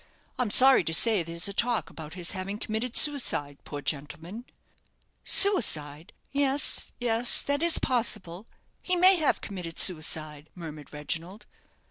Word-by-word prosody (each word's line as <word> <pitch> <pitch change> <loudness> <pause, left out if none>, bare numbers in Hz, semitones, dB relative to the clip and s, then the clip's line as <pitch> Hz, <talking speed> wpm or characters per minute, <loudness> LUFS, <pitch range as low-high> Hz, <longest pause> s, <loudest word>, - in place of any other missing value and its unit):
I'm 250 -4 0
sorry 260 0 +6
to 160 - +1
say 220 0 +3
there's 170 +2 -2
a 200 - -6
talk 235 +2 -1
about 160 +1 -10
his 175 -2 -4
having 195 +1 -6
committed 225 +3 -4
suicide, 195 - 0
poor 145 -1 -8
gentleman!" 170 - -6 0.8
"Suicide 160 - +3 0.2
yes 280 0 +1
yes 240 0 +2
that 285 +1 -1
is 340 -1 +3
possible; 215 -6 -3 0.3
he 365 - -1
may 370 +1 +6
have 310 -4 0
committed 180 -5 -8
suicide," 155 -3 -4
murmured 155 -4 -10
Reginald. 165 +7 -6
195 Hz, 135 wpm, -26 LUFS, 160-245 Hz, 0.8 s, sorry